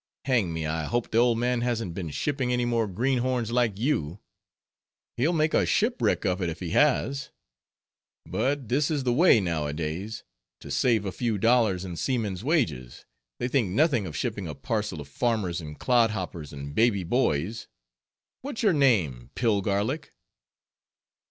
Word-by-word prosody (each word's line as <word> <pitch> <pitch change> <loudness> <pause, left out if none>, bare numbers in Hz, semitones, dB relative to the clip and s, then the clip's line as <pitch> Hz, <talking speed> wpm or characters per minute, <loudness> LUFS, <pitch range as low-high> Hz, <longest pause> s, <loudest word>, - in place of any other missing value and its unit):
Hang 120 -10 +2
me, 80 -1 -3
I 80 0 -2
hope 120 +5 -2
the 115 - +3
old 120 -1 +4
man 120 0 0
hasn't 115 -7 -1
been 85 -3 -5
shipping 130 - -1
any 125 0 +1
more 115 -2 +1
greenhorns 125 +2 0
like 120 -5 +1
you—he'll 105 - -1 1.1
make 155 -2 +1
a - - +4
shipwreck 235 - +1
of 95 0 0
it 90 - 0
if 80 - -6
he 90 -3 -5
has. 140 - +2 1.0
But 140 -2 -1
this 140 +6 +1
is 150 -4 -1
the 125 -1 +1
way 160 -3 +6
nowadays; 85 +4 -3 0.4
to - - -9
save 110 - +2
a 95 - -2
few 115 +1 -1
dollars 110 -4 +2
in 90 -2 -6
seamen's 105 -7 -2
wages, 120 - -1 0.3
they 120 - -2
think 125 -6 +1
nothing 120 - +2
of 80 - -6
shipping - - -3
a - - -6
parcel 105 -8 -3
of 70 - -10
farmers 95 - -1
and 75 -1 -8
clodhoppers 105 - 0
and 70 0 -7
baby 110 -1 +2
boys. 105 - 0 0.7
What's 265 -3 -5
your 205 -4 +4
name, 90 - +2
Pillgarlic?" 105 +4 0
115 Hz, 155 wpm, -27 LUFS, 90-125 Hz, 1.1 s, way